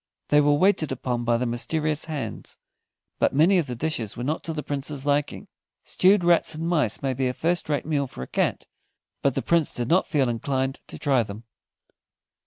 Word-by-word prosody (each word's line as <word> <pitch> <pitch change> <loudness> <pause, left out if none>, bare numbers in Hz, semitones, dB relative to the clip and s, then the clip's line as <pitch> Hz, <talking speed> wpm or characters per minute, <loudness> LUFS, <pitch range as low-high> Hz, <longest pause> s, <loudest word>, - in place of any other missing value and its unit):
They 150 0 +5
were 145 0 +4
waited 165 -2 +2
upon 125 -2 -2
by 120 0 +2
the 125 - -1
mysterious 150 +6 -1
hands, 155 -4 -6 0.6
but - - +2
many 175 +6 +5
of 160 - -2
the 125 - -4
dishes 120 -6 -3
were 120 - -4
not 150 +5 -2
to 165 - -2
the 155 -2 -4
Prince's 140 0 -3
liking. 145 0 -1 0.4
Stewed 190 0 +3
rats 170 -2 +3
and 165 +2 -3
mice 150 - +1
may 135 -1 0
be 130 +1 -1
a 125 - -2
first 170 +2 -1
rate 145 -2 0
meal 145 -3 0
for 65 - -8
a - - -8
cat, - - -1 0.6
but 140 -2 +1
the - - -1
Prince 170 -3 +2
did 120 0 -2
not 180 +3 +3
feel 140 -4 +1
inclined 130 +3 -2
to - - -9
try 135 -5 +2
them. 105 0 -7
145 Hz, 200 wpm, -25 LUFS, 125-160 Hz, 0.6 s, They